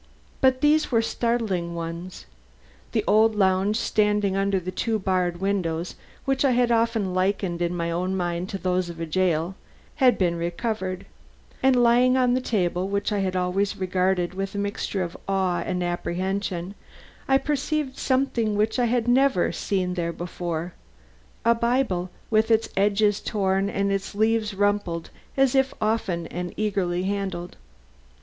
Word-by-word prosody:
But 260 -1 +3
these 300 0 +3
were 230 -2 +3
startling 220 -8 -1
ones. 170 +2 -6 0.7
The 220 - 0
old 220 +1 +4
lounge 190 +1 +2
standing 210 -3 +1
under 195 0 +1
the 185 +1 -5
two 220 +4 -1
barred 185 -3 0
windows 180 -4 -1 0.3
which 270 0 +1
I 275 - +4
had 240 0 +2
often 225 -4 +1
likened 185 -2 0
in 175 0 0
my 170 0 -1
own 185 +3 -1
mind 175 +1 -2
to 195 - -3
those 185 -1 -1
of 170 -1 -8
a 165 - -2
jail, 170 0 0 0.4
had 255 -5 +4
been 175 -3 +1
recovered; 185 +2 -3 0.6
and 265 0 +4
lying 250 +2 +4
on 250 -1 +3
the 255 - +1
table, 185 -6 0
which 200 +2 -1
I 205 - 0
had 190 -1 -1
always 185 +2 0
regarded 185 -1 0
with 195 +1 -4
a - - -2
mixture 200 -1 -2
of 170 -1 -6
awe 190 -3 +1
and 180 +1 -2
apprehension, 180 +1 -2 0.5
I 270 - +5
perceived 290 0 -1
something 255 -5 0
which 215 +4 +1
I 245 - +3
had 240 0 0
never 250 -6 +3
seen 180 +1 -1
there 170 -2 -2
before: 170 0 -4 0.7
a 235 - +6
Bible, 235 -6 0 0.2
with 220 +1 +3
its 225 0 +3
edges 205 +1 +2
worn 195 -1 +1
and 200 0 0
its 195 0 -3
leaves 220 -1 +1
rumpled 205 -4 0 0.3
as 270 -2 +4
if 270 0 +2
often 215 -6 -1
and 175 0 -5
eagerly 190 -4 0
handled. 190 -3 -3
195 Hz, 155 wpm, -25 LUFS, 180-225 Hz, 0.7 s, a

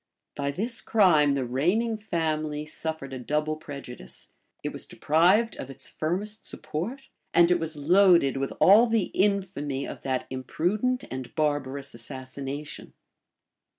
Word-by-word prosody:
By 140 0 -2
this 215 - -2
crime 155 -10 +4
the 135 -2 -1
reigning 180 - +1
family 155 -7 -2
suffered 155 -3 -4
a 130 - -5
double 150 +4 -1
prejudice 140 - -10 0.3
it - - -3
was - - -7
deprived 185 +9 +3
of 135 - -7
its 135 - -4
firmest 200 +7 -3
support; 175 - -6 0.3
and 170 0 +6
it 175 - +3
was 160 -1 -2
loaded 170 -2 +5
with 135 0 -2
all 215 +5 +7
the 225 -3 0
infamy 185 -9 0
of - - -8
that 130 -1 -2
imprudent 195 - -1
and 130 -2 -6
barbarous 140 -2 -1
assassination. 135 +4 -7
155 Hz, 135 wpm, -27 LUFS, 140-195 Hz, 0.3 s, all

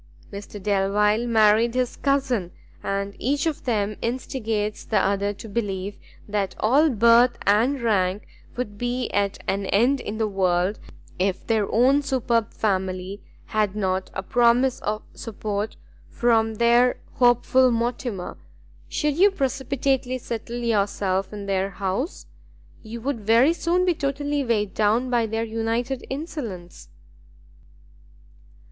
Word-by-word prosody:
Mr 205 +1 -8
Delvile 210 +3 +1
married 225 +1 +4
his 255 -1 0
cousin, 265 -10 0 0.3
and 200 0 -3
each 280 +4 0
of 320 -3 -2
them 215 -4 -1
instigates 225 -3 -2
the 215 - 0
other 200 +1 +1
to 215 - -10
believe 200 -2 -3 0.3
that 200 -2 -2
all 280 +9 +4
birth 235 +1 +5
and 230 +8 +3
rank 195 -3 +1 0.3
would 205 -5 -4
be 245 0 -2
at 200 -1 0
an 195 0 -1
end 245 +9 +3
in 215 -2 -5
the 220 -1 0
world, 190 0 0 0.4
if 190 0 -1
their 220 -3 0
own 260 +5 +4
superb 235 -5 0
family 190 -1 -2 0.2
had 210 -2 0
not 190 -2 -1
a 190 - -3
promise 245 +4 +3
of 215 +1 -3
support 210 -1 -4 0.3
from 225 -2 +2
their 235 +2 +4 0.2
hopeful 250 +1 +4
Mortimer. 235 -4 -3 0.5
Should 300 -3 0
you 400 +2 +7
precipitately 270 -4 -1
settle 235 -1 -5
yourself 200 -3 0
in 205 -1 -7
their 195 0 0
house, 190 0 -3 0.6
you 225 +1 -8
would 265 0 -2
very 230 +9 +4
soon 350 +2 +1
be 360 - +3
totally 285 0 -2
weighed 210 -5 0
down 225 +4 +1
by 235 -2 +2
their 225 +1 -2
united 230 +3 -2
insolence." 245 - -6
225 Hz, 130 wpm, -24 LUFS, 200-250 Hz, 0.6 s, you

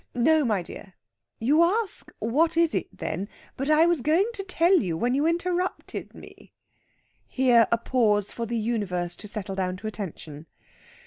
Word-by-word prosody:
No, 310 +5 +3
my 210 -7 0
dear. 185 +2 -11 0.4
You 285 +8 +3
ask, 395 +4 0
'What 315 +9 +1
is 335 -1 +3
it, - - -1
then?' 185 +6 -5 0.3
But 275 +3 -3
I 310 +2 +5
was 345 -5 +1
going 320 - +2
to 395 - -5
tell 365 0 +3
you 170 -5 -2
when 245 +7 0
you 285 +4 +2
interrupted 355 +2 -2
me." - - -15 0.7
Here 245 -3 +4
a 235 - +4
pause 215 -4 +1
for 230 -1 -5
the 235 +1 -2
Universe 205 -6 -2
to 210 - -10
settle 205 -1 -5
down 185 -1 -2
to 200 - -12
attention. 165 -7 -7
240 Hz, 170 wpm, -26 LUFS, 205-330 Hz, 0.7 s, I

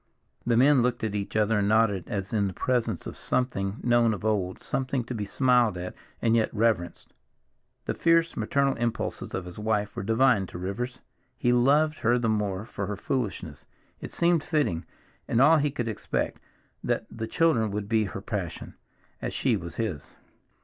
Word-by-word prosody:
The 115 -1 +3
men 135 +1 +5
looked 120 -1 0
at 110 -2 -1
each 100 0 -4
other 110 0 +2
and 100 - +1
nodded, 105 -3 +2
as 100 -3 -4
in 100 -2 +2
the 95 - -4
presence 115 -7 -1
of - - -6
something 105 -6 -1
known 120 -2 +3
of 105 - -8
old, 95 -4 0
something 130 -1 -1
to 120 - -6
be 105 -3 -3
smiled 120 -3 +3
at, 90 +1 -5 0.3
and 115 -1 +4
yet 115 -1 +2
reverenced. 105 -6 -1 0.7
The - - -1
fierce 165 0 +2
maternal 135 +5 +1
impulses 115 -1 -3
of 95 - -4
his 90 +3 -9
wife 105 -1 -1
were - - -3
divine 115 -1 +3
to - - -8
Rivers, 100 +8 -4 0.4
he 120 - +2
loved 145 +5 +3
her 120 +2 +3
the 120 -2 0
more 105 -2 -1
for 100 -4 -5
her 105 -1 -4
foolishness; 95 - -3 0.3
it - - -7
seemed 170 -2 +2
fitting, 145 - 0 0.4
and 115 - +1
all 155 +5 +7
he 145 0 +1
could 120 -4 -3
expect, 110 - -2 0.4
that - - -1
the 115 0 -5
children 120 - +2
should 100 0 -3
be 110 0 +2
her 95 0 -6
passion, 95 -6 -5 0.5
as - - -4
she 130 -4 +2
was 85 -4 -6
his. 105 -11 -4
110 Hz, 185 wpm, -27 LUFS, 100-125 Hz, 0.7 s, all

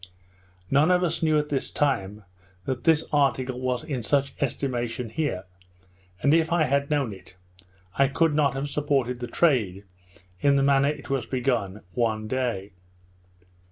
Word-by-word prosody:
None 145 +5 +4
of 180 0 +3
us 165 -1 -1
knew 155 -2 +3
at 150 0 -1
this 140 -2 -1
time, 105 -8 -1 0.4
that 130 -2 -3
this 160 -2 +4
article 130 -3 +1
was 130 +1 -1
in 140 -6 -3
such 135 +4 0
estimation 125 -3 -2
here; 115 -9 -2 0.8
and, 140 - +4
if 165 +1 +3
I 170 -2 +3
had 140 0 0
known 140 -7 0
it, 95 -1 -15 0.6
I 140 - +4
could 160 +3 +1
not 145 -3 +2
have 135 +2 -2
supported 140 -4 0
the 120 - -4
trade, 115 - +1 0.6
in 140 -1 +4
the 135 - +3
manner 140 0 +4
it 150 - -6
was 130 -4 -1
begun, 120 -6 -1
one 110 -1 0
day. 115 -5 -2
135 Hz, 155 wpm, -25 LUFS, 120-145 Hz, 0.8 s, None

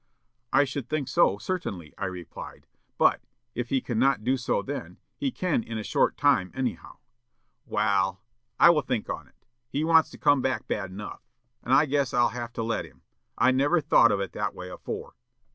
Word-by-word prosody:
"'I 135 - +5
should 135 -2 -5
think 155 -4 -1
so, 135 - +3
certainly,' 100 - -4
I - - -3
replied. 90 -3 -8 0.3
'But, - - +4 0.3
if 120 0 -4
he 135 -1 +1
cannot 125 0 +1
do 130 +3 +2
so 125 -1 -1
then, 90 -11 -6 0.2
he 280 - -1
can 180 - 0
in 115 0 -6
a 110 - -4
short - - +1
time, 90 0 +3
anyhow.' 130 -3 -4 0.7
"'Wal, 95 -3 +1 0.4
I 170 - +9
will 155 -3 +2
think 125 -4 -3
on - - -6
it. - - -27 0.3
He 145 +4 -1
wants 160 -1 +5
to - - -12
come 145 -2 +3
back 130 - -1
bad 95 - -2
enough, 100 +2 -8 0.4
and 125 - -5
I 140 +3 +6
guess 140 -3 0
I'll 120 -1 +4
have 120 0 -6
to 115 - -3
let 115 0 -1
him. - - -16 0.3
I - - +4
never 145 +6 +3
thought 115 -6 +5
of 100 - +1
it 95 -3 -3
that - - -3
way 90 0 -8
afore.' - - -6
125 Hz, 195 wpm, -27 LUFS, 105-145 Hz, 0.7 s, I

